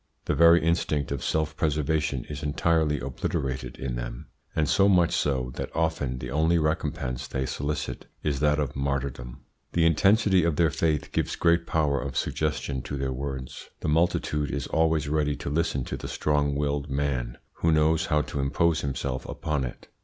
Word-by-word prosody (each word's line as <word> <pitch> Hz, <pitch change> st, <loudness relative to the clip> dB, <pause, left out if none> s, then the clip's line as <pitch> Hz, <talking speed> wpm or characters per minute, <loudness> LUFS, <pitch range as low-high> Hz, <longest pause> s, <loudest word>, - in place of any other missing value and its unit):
The -, -, +1 dB
very 85 Hz, +1 st, +6 dB
instinct 80 Hz, -4 st, 0 dB
of 70 Hz, -2 st, -3 dB
self 80 Hz, -1 st, 0 dB
preservation 75 Hz, -3 st, 0 dB
is 75 Hz, -1 st, -6 dB
entirely 75 Hz, 0 st, +1 dB
obliterated 65 Hz, 0 st, -3 dB
in 65 Hz, -2 st, -3 dB
them, -, -, -6 dB, 0.3 s
and 75 Hz, -2 st, +2 dB
so 100 Hz, +5 st, +4 dB
much 90 Hz, -3 st, +4 dB
so 65 Hz, -3 st, 0 dB
that -, -, -3 dB
often 80 Hz, -6 st, 0 dB
the 65 Hz, 0 st, -6 dB
only 80 Hz, +4 st, +3 dB
recompense 75 Hz, -5 st, -1 dB
they 65 Hz, 0 st, -2 dB
solicit 70 Hz, +3 st, -3 dB, 0.2 s
is 70 Hz, -3 st, 0 dB
that 75 Hz, 0 st, +3 dB
of 75 Hz, -2 st, -2 dB
martyrdom. 70 Hz, -2 st, -3 dB, 0.3 s
The 85 Hz, -1 st, +3 dB
intensity 95 Hz, +3 st, +4 dB
of 85 Hz, -2 st, +1 dB
their 80 Hz, -1 st, +3 dB
faith 80 Hz, -1 st, 0 dB
gives -, -, -1 dB
great 85 Hz, 0 st, +2 dB
power 75 Hz, -4 st, +1 dB
of 65 Hz, -1 st, -4 dB
suggestion 75 Hz, -3 st, -1 dB
to 70 Hz, -, -5 dB
their 65 Hz, -1 st, -2 dB
words. 65 Hz, -1 st, -6 dB
The -, -, -1 dB
multitude 75 Hz, -2 st, +1 dB
is 70 Hz, -2 st, -2 dB
always 80 Hz, -2 st, +1 dB
ready 75 Hz, -1 st, +1 dB
to 70 Hz, -, -5 dB
listen 75 Hz, -4 st, 0 dB
to -, -, -5 dB
the -, -, -6 dB
strong 75 Hz, -1 st, 0 dB
willed 70 Hz, 0 st, -1 dB
man, 65 Hz, -4 st, -1 dB, 0.2 s
who 85 Hz, -, +2 dB
knows 80 Hz, +1 st, +3 dB
how 75 Hz, -2 st, +2 dB
to 70 Hz, -, -5 dB
impose 75 Hz, +4 st, +2 dB
himself 65 Hz, -1 st, -3 dB
upon 75 Hz, -3 st, -2 dB
it. -, -, -8 dB
75 Hz, 175 wpm, -27 LUFS, 70-80 Hz, 0.3 s, very